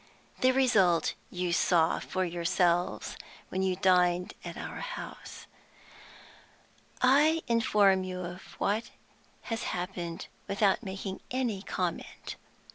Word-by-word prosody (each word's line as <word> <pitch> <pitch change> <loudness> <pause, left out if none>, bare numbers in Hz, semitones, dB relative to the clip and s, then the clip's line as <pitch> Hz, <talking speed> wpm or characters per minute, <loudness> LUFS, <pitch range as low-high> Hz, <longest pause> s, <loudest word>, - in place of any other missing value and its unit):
The 255 - +5
result 200 -11 +3 0.2
you 180 -1 -2
saw 170 -2 +3
for 185 0 -2
yourselves 175 0 0 0.3
when 190 - -2
you 190 -1 +1
dined 180 -1 +3
at - - -7
our - - -6
house. - - -7 1.6
"I 300 +5 +5
inform 205 -5 +4
you 185 -1 -4
of 180 +1 -6 0.2
what 215 +3 0 0.6
has 225 - -2 0.2
happened 175 -2 -4 0.2
without 200 0 +2
making 195 -2 -5
any 245 -6 -1
comment. - - -4
190 Hz, 110 wpm, -30 LUFS, 180-225 Hz, 1.6 s, The